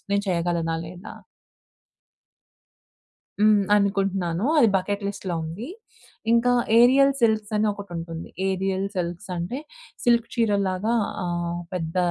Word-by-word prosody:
నేను 200 0 +2
చేయగలనా? 170 -1 0
లేదా? 180 +4 -10 2.3
హ్మ్. 210 -1 +5
ఆనుకుంటన్నాను 195 -2 0
అది 235 - +6
బకెట్ 200 +2 -2
లిస్ట్‌లో 190 -3 -4
ఉంది. 170 - -6 0.6
ఇంకా 235 +1 +4 0.3
ఏరియల్ 270 +3 +6
సిల్క్స్ 220 -2 +1
అని 215 - +2
ఒకటి 200 -1 -10
ఉంటుంది. 165 0 -6 0.2
ఏరియల్ 190 0 -1
సిల్క్స్ 175 +2 -4
అంటే 180 +11 -3 0.5
సిల్క్ 235 -1 +3
చీరల్లాగా 205 -1 +1 0.3
ఆహ్, 175 0 -2
పెద్ద 165 -1 -4
195 Hz, 110 wpm, -24 LUFS, 175-215 Hz, 2.3 s, అది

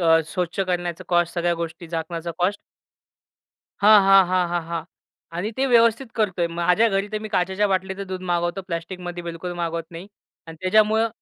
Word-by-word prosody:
अ, 165 -1 +5
स्वच्छ 180 +2 -3
करण्याचा 175 -2 -2
कॉस्ट. 175 -1 +1
सगळ्या 175 0 +1
गोष्टी 170 +1 -6
झाकण्याचा 165 +1 -4
कॉस्ट. 190 +3 0 1.2
हां, 210 0 +8
हां, 195 -1 +6
हां, 185 -1 +2
हां, 175 0 -1
हां 170 -1 -3 0.5
आणि 195 +5 -2
ते 270 - +1
व्यवस्थित 235 0 +4
करतोय. 190 -6 0
माझ्या 175 +6 +2
घरी 195 0 -1
तर 215 - -1
मी 215 - -6
काचेच्या 190 +1 0
बाटलीचं 190 +1 -2
दूध 185 0 -5
मागवतो. 175 +1 -1
प्लास्टिकमध्ये 175 0 -5
बिलकुल 170 +1 -5
मागवत 170 -1 -3
नाही 170 +3 -9 0.4
अन् 165 0 -10
त्याच्यामुळं 215 +4 +3
180 Hz, 165 wpm, -23 LUFS, 170-195 Hz, 1.2 s, हां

